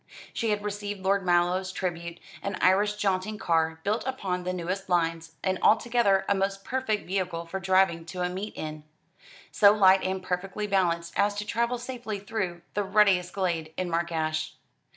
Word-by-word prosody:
She 230 - -1
had 205 -1 0
received 205 -1 -4
Lord 195 +1 +1
Mallow's 180 +1 +2
tribute, 170 -2 -4 0.2
an 200 -1 -3
Irish 205 +3 +3
jaunting 205 +1 -1
car, 160 -3 +1
built 210 +3 0
upon 185 -9 -3
the 180 - 0
newest 185 +2 -4
lines, 165 -2 0
and 190 -1 0
altogether 220 -4 +3
a - - +3
most 195 0 -1
perfect 250 -5 -1
vehicle 180 -3 -2
for 190 +3 -4
driving 190 -3 +2
to 180 +2 -6
a - - +1
meet 195 +4 -5
in, 155 -1 -6 0.7
so 200 -2 +6
light 190 -2 +5
and 190 0 -2
perfectly 190 +3 -3
balanced 170 -4 0
as 205 0 +2
to 205 +1 -3
travel 235 +3 0
safely 240 -3 -5
through 195 -4 -4
the 205 - 0
ruttiest 195 -3 +3
glade 170 -5 -2
in 185 -1 -2
Mark 170 +1 0
Ash. 155 -1 -2
190 Hz, 170 wpm, -27 LUFS, 175-205 Hz, 0.7 s, so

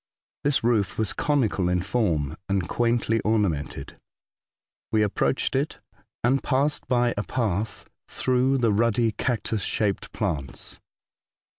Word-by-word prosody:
This 145 -3 +3
roof 110 -5 +1
was 110 -3 0
conical 115 -11 +1
in 90 -1 +1
form, 85 - 0
and 95 -4 0
quaintly 115 0 +1
ornamented. 100 -10 -1 0.9
We 110 -1 +3
ap 105 - -1
proached 135 - 0
it, 140 +3 0 0.5
and 130 +3 +3
passed 145 +2 0
by 120 -1 +2
a 105 - 0
path 110 -4 -2 0.2
through 130 +1 +1
the 120 -4 +2
ruddy 115 +1 +2
cactus 115 -2 -1
shaped 100 0 -1
plants. 80 -11 -4
110 Hz, 125 wpm, -25 LUFS, 100-125 Hz, 0.9 s, This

